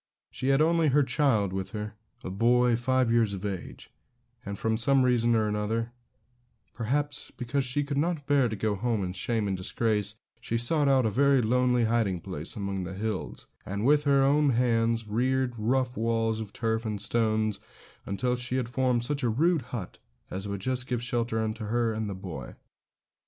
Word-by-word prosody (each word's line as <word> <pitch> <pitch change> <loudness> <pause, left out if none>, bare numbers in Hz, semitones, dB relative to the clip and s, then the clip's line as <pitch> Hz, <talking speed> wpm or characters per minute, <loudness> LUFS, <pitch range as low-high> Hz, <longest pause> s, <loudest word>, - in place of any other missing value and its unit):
She 130 - -4
had 135 +2 +4
her - - +6
only 165 -1 +3 0.2
child 125 -8 +1
with 95 0 -4
her, 105 0 -4 0.3
a 95 - -5
boy 120 +4 +3
five 130 0 +1
years 115 -3 +2
of 100 +1 -5
age; 95 -3 -6 0.5
and 100 0 -5
from 110 +2 0
some 130 +4 +3
reason 120 -2 +3
or 105 -1 +1
other, 115 +3 -2 0.8
perhaps 145 +5 -2
because 130 +3 -1
she 130 +3 0
could 140 0 -2
not 160 -2 -1
bear 140 -4 +3
to 110 - -3
go 105 +1 0
home 110 0 -1
in 90 -1 -3
shame 105 +3 -1
and 95 - -1
disgrace, 105 +2 -1 0.2
she 115 0 -2
sought 145 +5 +2
out 135 -3 +4
a 110 - +1
very 140 +4 +4
lonely 125 +1 +2
hiding 110 -5 +1
place 85 -3 -4
among 100 -2 -3
the 90 +1 -6
hills, 105 -1 -4 0.2
and 100 +3 -3
with 145 +2 +4
her 140 -1 +4
own 145 +2 +3
hands 115 -2 +1
reared 130 +3 0
rough 125 +3 0
walls 115 -1 0
of 110 -2 -6
turf 115 -1 -1
and 105 -3 -3
stones, 110 -1 +1 0.4
until 125 +5 -1
she 125 +1 -3
had 125 -2 -2
formed 125 -1 +1
such 145 +1 -1
a 120 - +1
rude 160 +7 +2
hut 105 -8 -6 0.3
as 95 +2 -4
would 100 -1 -4
just 130 +3 -1
give 120 -2 -2
shelter 120 -2 -1 0.2
to 110 -1 -7
her 115 0 +1
and 110 0 -3
her 100 - -4
boy. 90 -9 -8
115 Hz, 190 wpm, -28 LUFS, 105-130 Hz, 0.8 s, her